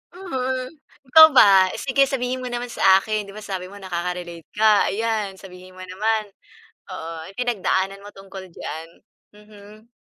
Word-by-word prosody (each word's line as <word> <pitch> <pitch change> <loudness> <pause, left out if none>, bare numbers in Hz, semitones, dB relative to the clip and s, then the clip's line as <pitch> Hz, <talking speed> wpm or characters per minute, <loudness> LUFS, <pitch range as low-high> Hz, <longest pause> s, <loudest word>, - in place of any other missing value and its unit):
Mm. 260 -8 -4 0.4
Ikaw 315 +3 +10
ba, 195 -4 +7
sige 275 0 +1
sabihin 255 -1 -3
mo 255 - -6
naman 245 0 -5
sa 190 -1 +4
akin. 215 -1 -3
Di 200 - -12
ba 215 - -9
sabi 190 -3 -5
mo 200 - -13
nakaka-relate 175 -3 -6
ka, 215 -1 +4
ayan, 215 -2 -2
sabihin 185 -1 -14
mo 185 - -10
naman. 215 +4 -1 0.7
Oo, 165 -2 -7
anong 195 +6 -12
pinagdaanan 195 -4 -1
mo 205 - -12
tungkol 195 -1 -11
diyan? 160 +2 -7 0.5
Mhm. 210 +1 -17
205 Hz, 155 wpm, -22 LUFS, 185-235 Hz, 0.7 s, Ikaw